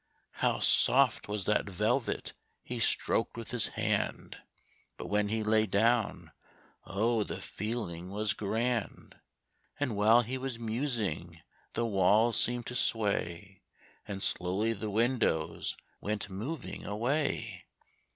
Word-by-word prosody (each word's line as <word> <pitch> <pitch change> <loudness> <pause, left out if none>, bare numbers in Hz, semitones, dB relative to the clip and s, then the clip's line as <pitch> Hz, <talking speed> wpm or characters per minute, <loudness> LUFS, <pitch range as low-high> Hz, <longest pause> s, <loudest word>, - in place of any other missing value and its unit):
How - - +2
soft 130 -3 +4
was 105 -2 -1
that 105 -1 +1
velvet 110 +7 -1 0.3
he 125 -1 -5
stroked 115 0 +2
with 115 -2 -6
his 120 -4 +1
hand! - - -2 0.6
But - - -7
when 105 0 +2
he 110 0 -1
lay 110 0 +3
down, 110 +3 +1 0.5
oh, 110 +2 +1
the - - -5
feeling 95 -5 -4
was 105 +1 +1
grand! 115 +2 -2 0.6
And 135 -7 -1
while 110 +4 +5
he 130 +3 -4
was 130 -2 -4
musing 110 - -3 0.3
the 120 - 0
walls 105 +3 +3
seemed 120 0 +1
to 125 - -5
sway, 100 -5 -1 0.5
And 100 -2 -5
slowly 95 +6 0
the 110 0 -4
windows 115 -7 0 0.2
went 105 -1 -3
moving 125 +10 -5
away. 125 +9 -2
110 Hz, 120 wpm, -31 LUFS, 100-120 Hz, 0.6 s, while